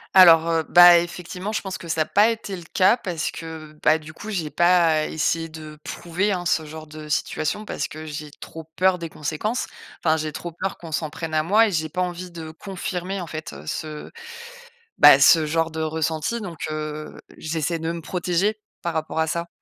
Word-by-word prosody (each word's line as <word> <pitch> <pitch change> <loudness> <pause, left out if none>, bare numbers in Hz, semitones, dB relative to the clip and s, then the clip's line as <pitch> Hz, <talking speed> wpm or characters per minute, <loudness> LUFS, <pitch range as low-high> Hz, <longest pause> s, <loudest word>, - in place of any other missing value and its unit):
Alors, 165 -3 +8
heu, 165 -1 +1
bah, 175 -1 +9
effectivement, 180 +3 -5
je - - -1
pense 190 -2 -5
que 170 - -9
ça 160 -1 0
a 155 - +2
pas 210 +3 +4
été 220 -4 -4
le 175 - -8
cas, 190 +6 +4
parce 175 -8 -3
que, 160 -2 -9
bah, 155 - +4
du 155 0 -11
coup, 210 - -9
j'ai 170 -8 -3
pas 170 -3 +3
essayé 165 +1 -1
de 155 -1 -10
prouver, 185 +5 -2
hein, 180 -2 -2
ce 160 -2 +1
genre 155 +1 -9
de 155 0 -10
situation 155 +7 -1
parce - - -3
que 155 +1 -9
j'ai 150 0 -6
trop 160 +2 -10
peur 185 -1 +3
des 165 -1 -5
conséquences. 160 +12 -3 0.4
Enfin, 160 -1 +4
j'ai 155 -1 -3
trop 170 +3 -6
peur 185 +3 -4
qu'on 165 -2 -10
s'en 155 0 -2
prenne 160 +1 -6
à 155 - +3
moi 210 +8 +4
et - - -2
j'ai 155 -2 -1
pas 180 +4 -2
envie 180 0 -3
de 165 -2 -8
confirmer 185 +1 -5
en 170 - -6
fait, 155 0 -6
heu, 70 +2 -11
ce, 155 - -5 0.9
bah, - - +9
ce 160 -2 +6
genre 165 +1 0
de 160 0 -5
ressenti, 160 +7 -1
donc 175 -5 -7
heu, 155 0 -5 0.2
j'essaie 160 +1 -2
de 165 +1 -3
me 170 -1 -6
protéger 180 +6 -1 0.2
par 170 - -2
rapport 160 0 -3
à 160 - +2
ça. 170 +1 -2
165 Hz, 210 wpm, -23 LUFS, 155-180 Hz, 0.9 s, bah